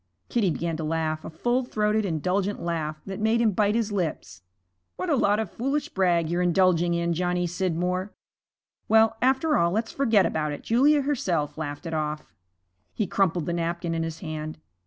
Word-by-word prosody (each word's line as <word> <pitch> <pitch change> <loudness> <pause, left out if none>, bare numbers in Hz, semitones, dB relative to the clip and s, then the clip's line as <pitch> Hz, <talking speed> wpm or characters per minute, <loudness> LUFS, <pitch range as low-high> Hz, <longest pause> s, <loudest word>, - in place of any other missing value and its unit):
Kitty 220 -6 +2
began 165 0 -2
to 160 - -4
laugh, 155 0 -1
a - - -6
full 240 +11 0
throated, 215 -2 0
indulgent 185 +4 -1
laugh, 155 -3 -3
that 195 0 -6
made 220 +2 +2
him 230 -2 +3
bite 205 +2 +1
his 225 -2 0
lips. 180 -6 -3 0.5
'What 365 - -2
a - - +4
lot 205 -5 +3
of 220 -5 -3
foolish 275 +5 -2
brag 175 -4 +2
you're 175 +2 0
indulging 175 -1 +3
in, 170 0 0
Johnny 180 +1 0
Scidmore. 180 +2 -1 0.8
Well, 220 0 +5
after 265 +4 +3
all, 170 - +3
let's 220 +5 -1
forget 225 -8 +3
about 150 -1 -1
it; - - -8
Julia 280 +5 +4
herself 180 - -1
laughed 145 0 -5
it 165 - -4
off.' 150 -1 -3 0.6
He 215 - 0
crumpled 180 -4 +1
the 170 - -2
napkin 170 0 -2
in 165 - -1
his 165 0 -5
hand. 155 -2 -5
180 Hz, 180 wpm, -26 LUFS, 165-220 Hz, 0.8 s, Well